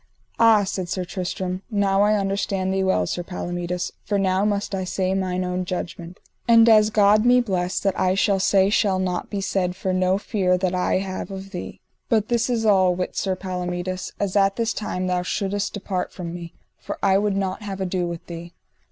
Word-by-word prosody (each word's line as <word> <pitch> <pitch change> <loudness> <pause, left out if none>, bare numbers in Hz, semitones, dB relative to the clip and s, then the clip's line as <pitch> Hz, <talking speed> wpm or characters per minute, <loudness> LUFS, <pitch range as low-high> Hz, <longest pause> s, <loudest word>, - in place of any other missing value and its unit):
Ah, 225 -2 +6
said 185 -2 -3
Sir 185 0 -2
Tristram, 185 0 -4
now 200 -3 +2
I 210 +1 +4
understand 195 -1 -1
thee 190 0 +1
well, 190 - +2
Sir 175 - -3
Palomides, 175 0 -4
for 205 - -1
now 190 0 +1
must 205 -1 -1
I 190 -1 -1
say 185 +1 -1
mine 185 -1 -1
own 180 0 -2
judgment, 175 -1 -6 0.3
and 230 -1 +7
as 215 -1 +6
God 215 0 +4
me 245 +1 +5
bless, 185 -6 -1
that 195 -1 +1
I 185 0 +2
shall 195 0 +2
say 195 +1 +3
shall 200 -3 +2
not 180 -1 -2
be 200 -2 -3
said 185 -2 -1
for 190 0 -2
no 185 +1 +2
fear 190 -3 +1
that 185 0 -1
I 180 0 +1
have 190 +1 -4
of 195 0 -8
thee. - - -7 0.3
But 220 -3 +2
this 235 0 +1
is 230 -2 0
all: 190 -4 +4
wit 180 0 -3
Sir 190 -1 0
Palomides, 180 0 -4
as 200 -2 -1
at 195 -1 +3
this 230 -1 0
time 185 -3 -3
thou 180 -1 0
shouldest 200 +3 -2
depart 190 -2 -3
from 170 -2 -6
me, 170 -1 -8 0.2
for - - -6
I 195 0 +4
would 205 -1 0
not 190 +1 -2
have 200 -2 -6
ado 185 -1 -1
with 170 -1 -6
thee. 170 0 -8
190 Hz, 205 wpm, -23 LUFS, 180-200 Hz, 0.3 s, and